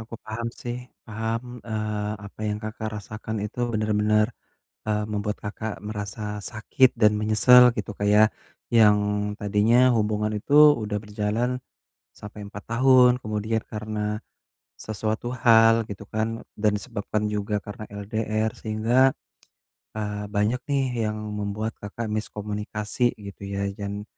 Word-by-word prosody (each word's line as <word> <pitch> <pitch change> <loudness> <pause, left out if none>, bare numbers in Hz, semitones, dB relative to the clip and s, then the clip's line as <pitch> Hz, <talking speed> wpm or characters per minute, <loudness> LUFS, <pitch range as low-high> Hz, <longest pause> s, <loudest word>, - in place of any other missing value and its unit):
Aku 110 +1 -9
paham 115 +2 -4
sih 120 0 -3 0.3
paham, 115 +1 -2 0.2
eee, 105 -2 -2
apa 100 - -14
yang 105 0 -2
Kakak 110 0 -4
rasakan 110 +2 -6
itu 110 +3 -7
bener-bener, 105 0 +2 0.6
eee, 105 0 +1
membuat 105 0 -2
Kakak 110 +1 -4
merasa 105 0 -5
sakit 120 +3 +3
dan 105 -2 +5
menyesal 110 +4 +7
gitu 105 -1 -3
Kak 100 - 0
ya, 105 +1 +7 0.5
yang 105 -3 +6 0.4
tadinya 105 +4 +3 0.2
hubungan 105 0 0
itu 140 +7 -2 0.3
udah 105 0 -2
berjalan 105 +3 -1 0.6
sampai 105 0 -9
4 105 0 -9
tahun. 125 +1 +6
Kemudian, 110 +1 -1
karena 105 0 -3 0.6
sesuatu 110 +2 -3 0.2
hal 115 -1 +6
gitu 100 +1 -8
kan 110 +1 -2 0.2
dan 105 0 +2
disebabkan 105 -2 -3
juga 105 0 -1
karena 105 +1 -7
LDR 110 +1 -2
sehingga, 115 +5 +2 0.8
eee, 105 -1 -3
banyak 105 +5 +1
nih 135 -1 +2 0.2
yang 105 - -3 0.2
membuat 105 +2 -3
Kakak 105 +2 -5
miskomunikasi 105 +2 -2
gitu 100 0 -10
ya 100 0 -1
dan 100 0 -4
105 Hz, 130 wpm, -25 LUFS, 105-110 Hz, 0.8 s, menyesal